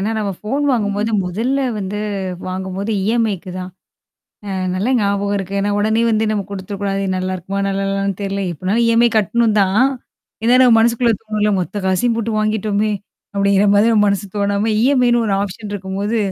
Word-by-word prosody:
ஏனா, 210 Hz, +3 st, -1 dB
நம்ம 205 Hz, -2 st, -1 dB
ஃபோன் 265 Hz, +7 st, -2 dB
வாங்கும்போது 210 Hz, -2 st, 0 dB
மொதல்ல 230 Hz, +10 st, -1 dB, 0.2 s
வந்து 200 Hz, +1 st, -4 dB, 0.5 s
வாங்கும்போது 190 Hz, +2 st, -4 dB
இஎம்ஐக்கு 215 Hz, -4 st, 0 dB
தான். 185 Hz, 0 st, -6 dB, 0.8 s
அ -, -, -4 dB, 0.2 s
நல்லா 200 Hz, +7 st, 0 dB
ஞாபகம் 200 Hz, 0 st, 0 dB
இருக்கு. 195 Hz, 0 st, -4 dB
ஏன்னா 205 Hz, +1 st, 0 dB
உடனே 220 Hz, +2 st, +1 dB
வந்து 220 Hz, 0 st, +1 dB
நம்ம 210 Hz, -2 st, 0 dB
குடுத்துறக்கூடாது 195 Hz, 0 st, -3 dB
நல்லாருக்குமா? 185 Hz, +1 st, -3 dB
நல்லாலான்னு 195 Hz, 0 st, -1 dB
தெர்ல. 195 Hz, 0 st, -2 dB
எப்பனாலும் 190 Hz, +8 st, 0 dB
இஎம்ஐ 230 Hz, +1 st, +4 dB
கட்டணும் 220 Hz, +2 st, +1 dB
தான். 200 Hz, +6 st, +3 dB, 0.6 s
ஏனா, 240 Hz, +2 st, +4 dB
நம்ம 245 Hz, -2 st, +6 dB
மனசுக்குள்ள 235 Hz, +1 st, +3 dB
தோணும்ல 210 Hz, -1 st, 0 dB
மொத்த 200 Hz, +3 st, -4 dB
காசையும் 225 Hz, +5 st, +1 dB
போட்டு 230 Hz, 0 st, -2 dB
வாங்கிட்டோமே. 215 Hz, 0 st, 0 dB, 0.4 s
அப்டிங்கிற 200 Hz, 0 st, +3 dB
மாரி 205 Hz, +3 st, +4 dB
நம்ம 210 Hz, -2 st, +4 dB
மனசு 200 Hz, 0 st, -1 dB
தோணாம 200 Hz, +2 st, 0 dB
இஎம்ஐன்னு 245 Hz, -2 st, +3 dB
ஒரு 200 Hz, -, +1 dB
ஆப்ஷன் 205 Hz, +2 st, -6 dB
இருக்கும்போது. 200 Hz, +3 st, -2 dB
205 Hz, 155 wpm, -18 LUFS, 195-225 Hz, 0.8 s, நம்ம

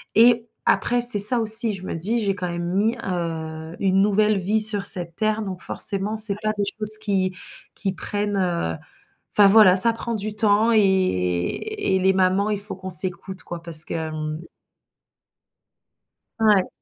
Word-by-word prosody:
et 235 Hz, +1 st, +3 dB, 0.2 s
après, 245 Hz, 0 st, 0 dB
c'est 240 Hz, -3 st, +3 dB
ça 225 Hz, +5 st, +5 dB
aussi, 220 Hz, 0 st, +1 dB
je 190 Hz, -, -10 dB
me -, -, -6 dB
dis, 210 Hz, +9 st, -3 dB
j'ai 200 Hz, -3 st, -2 dB
quand 180 Hz, -3 st, -6 dB
même 175 Hz, +1 st, -5 dB
mis, 220 Hz, +4 st, 0 dB
heu, 160 Hz, -2 st, -6 dB
une 195 Hz, -1 st, 0 dB
nouvelle 210 Hz, +1 st, +1 dB
vie 210 Hz, +4 st, -2 dB
sur 210 Hz, -2 st, +4 dB
cette 175 Hz, -4 st, +2 dB
Terre 215 Hz, +2 st, -2 dB
donc 190 Hz, -4 st, -8 dB
forcément 200 Hz, +2 st, +1 dB
c'est 215 Hz, -2 st, +6 dB
pas 215 Hz, -, -1 dB
des 205 Hz, -, -2 dB
choses 215 Hz, 0 st, +7 dB
qui 190 Hz, -3 st, -3 dB, 0.4 s
qui 195 Hz, -2 st, -4 dB
prennent, 205 Hz, +3 st, -4 dB
heu, 170 Hz, -, -3 dB, 0.6 s
enfin 205 Hz, -1 st, +4 dB
voilà, 195 Hz, -3 st, +5 dB
ça 230 Hz, +5 st, +7 dB
prend 230 Hz, +1 st, -6 dB
du 210 Hz, 0 st, -5 dB
temps 215 Hz, +1 st, +1 dB
et 220 Hz, -, +3 dB
et 190 Hz, -, -2 dB
et -, -, 0 dB
les 190 Hz, +1 st, +1 dB
mamans, 190 Hz, +2 st, 0 dB
il 205 Hz, -1 st, -2 dB
faut 205 Hz, -1 st, -3 dB
qu'on 190 Hz, 0 st, -9 dB
s'écoute 185 Hz, +2 st, 0 dB
quoi 170 Hz, -1 st, -9 dB
parce 165 Hz, -1 st, +2 dB
que -, -, -8 dB
hem 155 Hz, -1 st, -6 dB, 2.0 s
Ouais. 210 Hz, -4 st, +2 dB
195 Hz, 175 wpm, -21 LUFS, 180-215 Hz, 2.0 s, choses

